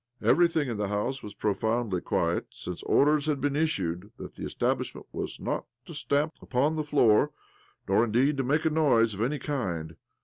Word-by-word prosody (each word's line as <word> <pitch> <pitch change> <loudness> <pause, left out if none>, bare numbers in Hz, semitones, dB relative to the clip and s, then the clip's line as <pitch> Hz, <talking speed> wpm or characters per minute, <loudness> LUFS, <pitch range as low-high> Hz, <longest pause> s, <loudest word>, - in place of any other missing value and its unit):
Everything 170 -4 +3
in 115 -4 -3
the 105 -1 -1
house 105 +7 -2
was 105 -1 -9
profoundly 110 -2 0
quiet, - - 0
since 90 -1 -7
orders 150 +1 +3
had 150 -3 +1
been 145 -1 0
issued 100 - -1
that - - -8
the - - -9
establishment - - -2
was - - -5
not - - -3 0.2
to 170 - -9
stamp 150 +1 0
upon 140 +5 +1
the 155 - -1
floor, 140 -3 +4 0.6
nor, 100 +4 +4
indeed, 125 +6 +2
to 135 - +1
make 150 +5 +1
a 160 - +3
noise 125 -8 +3
of 100 - -5
any 135 +6 0
kind. 85 - -3
130 Hz, 180 wpm, -28 LUFS, 105-150 Hz, 0.6 s, floor